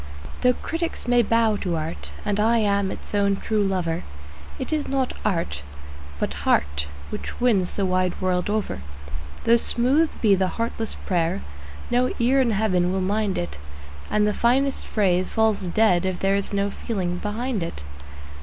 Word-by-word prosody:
Though 250 0 +5
critics 330 -5 -3
may 245 0 +5
bow 230 -1 +2
to 180 -4 -2
art, 160 +1 -4
and 205 0 0
I 225 +2 +4
am 200 -3 +2
its - - -8
own 200 -1 +3
true 215 +2 0
lover, 180 -4 0 0.6
It - - -3
is 305 -2 0
not 265 -2 0
art, 165 - -1 0.6
but - - -1
heart, 75 +1 +1 0.2
which - - -6
wins 215 -8 +2
the 200 - +1
wide 185 -1 0
world 185 0 0
over. 210 - -1 0.6
Though 235 +1 +5
smooth 265 +7 +2
be 210 -3 +4
the 190 -1 +2
heartless 230 -1 -2
prayer, 165 - 0 0.5
no 250 +1 +2
ear 260 +3 +3
in 250 - +2
Heaven 190 -4 +2
will 190 - 0
mind 205 +1 0
it, 75 -4 -4 0.5
And 210 0 +2
the 210 - +1
finest 265 +5 +1
phrase 185 -4 +1
falls 220 -4 +1
dead 180 -1 +3
if 185 -1 -1
there 195 +1 +2
is 200 - 0
no 200 0 0
feeling 185 -6 -3
behind 220 +1 -2
it. 165 - -5
205 Hz, 165 wpm, -24 LUFS, 185-230 Hz, 0.6 s, Though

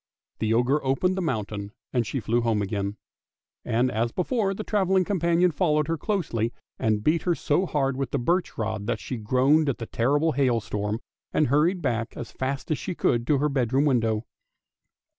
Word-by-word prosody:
The 110 0 0
ogre 130 +5 +2
opened 135 +8 +1
the 190 - -1
mountain, 105 - -3 0.2
and 120 -4 +1
she 135 - -2
flew 115 +2 +1
home 110 -3 +1
again; 100 +1 -3 0.7
and, 125 +3 +1
as 115 +1 0
before, 195 - 0
the 215 - -4
travelling 190 -3 +2
companion 175 -2 +2
followed 150 -2 +1
her 165 - 0
closely 145 - -1 0.3
and 110 -1 +1
beat 160 +5 +2
her 175 -2 +1
so 175 +6 +1
hard 135 -4 0
with 135 -2 -2
the 140 - -1
birch 170 +7 0
rod 110 -2 -3
that 120 -2 -1
she 125 - -5
groaned 130 +7 +3
at 135 - -1
the 115 - -5
terrible 145 +9 +1
hailstorm 115 -5 0 0.3
and 155 - +2
hurried 165 +6 +2
back 115 -1 -1
as 120 - -6
fast 135 +3 -3
as 155 - 0
she 180 - -4
could 120 -5 +1
to 150 - +4
her 145 +2 +2
bedroom 135 0 +1
window. 115 -5 +1
135 Hz, 185 wpm, -26 LUFS, 115-160 Hz, 0.7 s, to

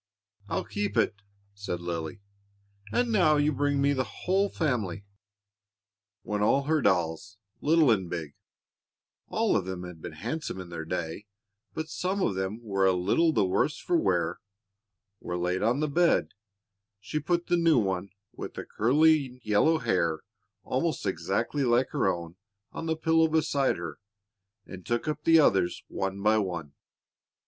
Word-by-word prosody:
"I'll - - -1
keep 105 +2 -3
it," 115 - +3 0.4
said 100 -3 -4
Lily; 85 +1 -5 0.7
"and 245 -1 +1
now 175 -8 +4
you 145 +1 +2
bring 145 0 0
me 140 +1 +3
the 130 -1 0
whole 195 +8 0
family." 110 - -2 1.2
When 105 -1 -2
all 135 +7 +3
her 155 +1 +1
dolls, 95 -1 0 0.2
little 155 -3 +4
and 95 -5 +1
big 80 -5 -5 0.9
all - - +1
of - - +1
them 95 -1 -5
had 90 -3 -9
been - - -7
handsome 115 - -4
in 90 -2 -8
their 80 -2 -6
day, 85 +4 -4 0.5
but 160 - -3
some 185 +4 -2
of 150 - +1
them 95 +5 -3
were 100 -3 +1
a 95 - +4
little 100 - +2
the 100 - +2
worse 100 +11 +1
for 175 - -1
wear 90 - +1 0.8
were 90 - -4
laid 90 +1 -1
on 120 +6 +1
the 155 - +1
bed, 170 +4 +2 0.7
she 100 +10 -3
put 170 +3 0
the 175 - +2
new 165 -3 +4
one, 95 -3 0 0.2
with - - -8 0.2
curling 140 +1 +3
yellow 110 +10 +3
hair 85 - 0 0.4
almost 155 +2 -1
exactly 100 - -1
like 125 +1 +2
her - - 0
own, 85 0 -7 0.3
on 165 - -6
the 160 -1 0
pillow 160 0 +3
beside 155 -3 +1
her, 85 -1 -6 0.7
and 95 -1 -10
took 120 - -2
up 150 0 -3
the 165 0 +7
others 95 - +2
one 95 0 -3
by 110 +1 +4
one. 85 -8 -4
110 Hz, 155 wpm, -28 LUFS, 90-155 Hz, 1.2 s, the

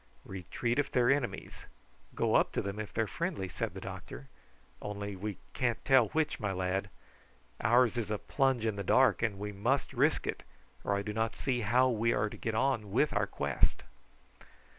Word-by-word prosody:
"Retreat 95 - -2
if 140 -1 0
they - - +2
are 120 +1 +5
enemies; 135 -3 -2 0.5
go - - +1
up - - +4
to - - 0
them 100 +1 -4
if 105 - -5
they 110 - +1
are - - -4
friendly," 165 - -2
said 85 - -4
the - - -5
doctor; 65 +3 -8 0.5
"only 100 -1 -4
we 100 0 -4 0.2
can't 120 -2 -1
tell 130 -5 +6
which, 155 +7 0
my 105 -4 -1
lad. 95 +2 -1 0.7
Ours 120 +1 +4
is 110 -3 -2
a 105 - 0
plunge 135 -1 +1
in 110 -2 0
the 100 - -2
dark, 125 +3 +4
and 110 -4 0
we 105 +1 -4
must 120 +8 0
risk - - +2
it, - - -3 0.4
or 100 - +1
I 100 - -1
do 105 0 -4
not 110 +1 -1
see 125 -3 -1
how 120 +4 +4
we 115 -1 +2
are 105 0 +1
to - - -7
get 115 -1 -3
on 110 -4 +1
with 135 +8 +2
our - - +1
quest." - - 0
110 Hz, 200 wpm, -32 LUFS, 100-125 Hz, 0.7 s, tell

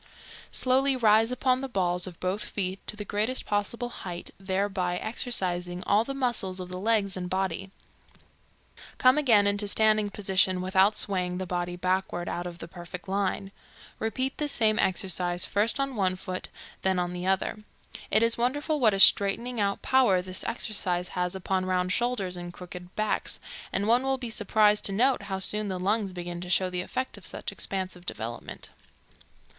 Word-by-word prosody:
Slowly 265 +1 +2
rise 225 -1 +4
upon 255 0 +1
the 270 - -4
balls 180 -4 0
of 175 -2 -10
both 190 +3 -1
feet 190 -2 -3
to - - -1
the 210 -1 -6
greatest 215 +6 -1
possible 220 +4 -1
height, 180 -6 -6
thereby 190 -2 -1
exercising 180 -6 -1
all 205 +4 +3
the 275 +3 -5
muscles 235 -8 -1
of 180 -1 -6
the 180 0 -5
legs 205 -2 +2
and 180 -1 -4
body; 190 0 -2 1.3
come 255 +3 +5
again 225 -8 +5
into 200 +1 +1
standing 215 0 +3
position 190 -2 +2
without 190 +3 +3
swaying 180 -3 -1
the 185 - -3
body 175 0 -2
backward 185 -1 -1
out 175 +1 -3
of 175 -1 -8
the 165 - -8
perfect 175 +2 -9
line. 195 0 -1 0.5
Repeat 260 +4 -2
this 295 -1 0
same 220 -4 +2
exercise, 180 -2 0
first 215 +6 +1
on 275 -1 -1
one 190 -3 +1
foot, 185 0 -6 0.3
then 190 -1 +1
on 180 0 -1
the 180 +1 -4
other. 190 +3 0 0.5
It 215 - +4
is 230 0 +2
wonderful 290 +5 0
what 220 -6 +4
a - - -2
straightening 225 +5 +4
out 200 0 -1
power 250 -8 +4
this 185 0 -3
exercise 185 -6 0
has 180 0 -1
upon 190 0 -1
round 185 0 0
shoulders 235 -7 0
and 175 0 -6
crooked 180 0 -10
backs, 215 0 0 0.3
and 200 - -1
one 240 +2 +4
will 270 0 0
be 245 -3 -5
surprised 210 0 +3
to - - +3
note 250 +5 +2
how 190 - -1
soon 210 +2 +2
the 190 -2 -2
lungs 200 +2 0
begin 175 -1 -6
to 180 - -7
show 185 0 +2
the 180 0 -1
effect 255 +8 -4
of - - -15
such - - -3
expansive 185 -2 -3
development. 115 +1 -6
195 Hz, 175 wpm, -27 LUFS, 180-225 Hz, 1.3 s, come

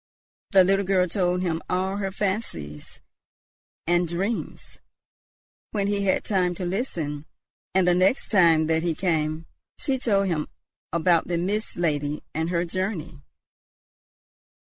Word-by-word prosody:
The 190 -1 +6
little 195 +2 +2
girl 185 -1 +2
told 180 0 0
him 165 -2 -1
all 190 +2 0
her 195 -1 -2
fancies 190 - -4 0.8
and 175 +1 +2
dreams, 190 +7 -4 0.9
when 205 -2 0
he 200 0 0
had 190 - +2
time 180 -3 +1
to 180 - -4
listen; 165 - -3 0.5
and 190 -1 +4
the 180 - +5
next 185 +8 +2
time 165 -6 +5
that 160 0 +1
he 170 -1 0
came, 160 -2 -1 0.3
she 265 -2 -1
told 200 -5 +2
him 165 -5 -1 0.4
about 170 0 +2
the 170 -1 0
Mist 205 +5 -1
Lady 150 -3 -1
and 160 +2 -1
her 175 0 0
journey. 170 -5 -3
180 Hz, 135 wpm, -25 LUFS, 160-195 Hz, 0.9 s, The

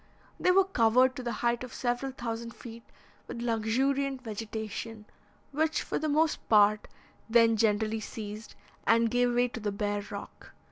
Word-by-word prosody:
They - - +2
were 385 +1 +6
covered, 255 - +3
to 255 - -5
the 240 -1 -3
height 235 +1 +1
of 250 - -9
several 245 +2 -1
thousand 230 -2 -5
feet, 235 -1 -10 0.5
with - - -6
luxuriant 260 +4 0
vegetation, 220 0 -6 0.5
which, 315 +2 0
for - - -2
the 310 - -1
most 310 +2 +1
part, 210 -1 +4 0.4
then 230 0 +5
generally 220 0 +1
ceased, 215 0 -8 0.3
and 230 0 +4
gave 245 0 +2
way 245 +1 +3
to 240 - -7
the 210 -2 -2
bare 205 0 -2
rock. 200 -1 -9
230 Hz, 155 wpm, -29 LUFS, 220-255 Hz, 0.5 s, were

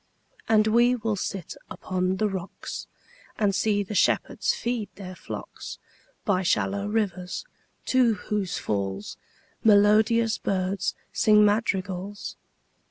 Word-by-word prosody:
And 215 -1 +5
we 240 +3 +4
will 225 -2 -1
sit 190 -2 -4 0.2
upon 185 0 -2
the 215 - +2
rocks, 190 -2 -6 0.5
5 - - -2
And 200 -1 +3
see 205 +1 +1
the 200 - -7
shepherds - - +2
feed 235 -3 -2
their 185 -2 -8
flocks - - -8 0.5
By 190 -4 +2
shallow 200 +2 0
rivers, 195 - -2 0.4
to 250 -4 +3
whose 200 -1 -2
falls 100 -1 -3 0.5
Melodious 215 +2 +4
birds 190 0 -1 0.2
sing 210 -2 +5
madrigals. 200 -2 -1
205 Hz, 115 wpm, -26 LUFS, 185-220 Hz, 0.5 s, And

